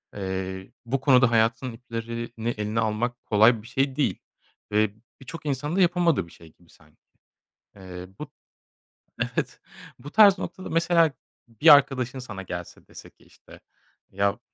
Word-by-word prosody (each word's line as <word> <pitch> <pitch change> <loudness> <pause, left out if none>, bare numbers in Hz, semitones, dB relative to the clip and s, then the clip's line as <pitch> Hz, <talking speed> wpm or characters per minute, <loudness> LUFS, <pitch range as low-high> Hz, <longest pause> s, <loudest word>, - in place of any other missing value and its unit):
eee, 95 -1 -5
bu 130 +3 -1
konuda 125 -3 +5
hayatın 115 +3 +1
iplerini 115 0 -6
eline 105 +2 -2
almak 115 +2 -2
kolay 110 +2 +4
bir 110 - -14
şey 135 +1 -1
değil 150 - 0 0.5
ve 105 0 +2 0.3
birçok 150 +3 -10
insanın 145 +3 -2
da 195 - +2
yapamadığı 170 - +2
bir - - -18
şey 80 -2 -17
gibi 85 -1 -27
sanki. 75 -1 -24 0.8
Eee, 90 -1 -9
bu - - -8 1.1
Evet. - - -2 0.4
Bu 145 +4 -10
tarz 205 -1 +7
noktada 185 - -7
mesela 165 -1 +3 0.4
bir 120 +7 +6
arkadaşın 130 -2 +2
sana 110 -6 -8
gelse 90 -2 -8
dese - - -13
ki - - -27
işte, - - -18 0.5
ya, 100 +3 0
115 Hz, 145 wpm, -25 LUFS, 100-140 Hz, 1.1 s, tarz